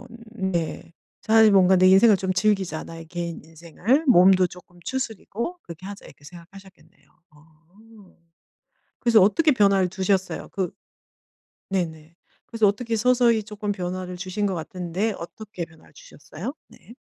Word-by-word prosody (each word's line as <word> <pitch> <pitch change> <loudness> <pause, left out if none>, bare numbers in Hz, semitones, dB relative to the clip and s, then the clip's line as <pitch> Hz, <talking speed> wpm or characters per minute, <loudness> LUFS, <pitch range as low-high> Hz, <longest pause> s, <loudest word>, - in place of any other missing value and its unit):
뭐 245 - -13 0.3
네. 175 -5 -3 0.3
'차라리 220 -1 +5
뭔가 190 -1 +5
내 185 0 +5
인생을 200 +3 +6
좀 190 0 -2
즐기자. 190 -6 0
나의 165 0 -10
개인 170 0 -6
인생을 170 - -1
몸도 185 -4 +6
쪼끔 175 0 -15
추스르고. 260 - -4
그렇게 170 +2 -11
하자.' 200 0 -9
이렇게 145 - -17
생각하셨겠네요. 185 +3 -16 0.2
어. 175 +8 -21 0.8
그래서 230 -4 +4
어떻게 300 - +4
변화를 200 -6 +3
두셨어요? 190 +1 -2
그 185 -4 -3 1.0
네네. 165 -4 -4 0.3
그래서 225 -2 +1
어떻게 225 +3 -1
서서히 235 -1 +3
쪼끔 210 -1 -4
변화를 180 -1 -5
주신 190 +3 -3
것 195 - -1
같은데 180 +5 -3
어떻게 185 +1 -7
변화를 160 -1 -21
주셨어요? 180 - -9
네. 235 - -17
190 Hz, 325 characters per minute, -24 LUFS, 175-215 Hz, 1.0 s, 인생을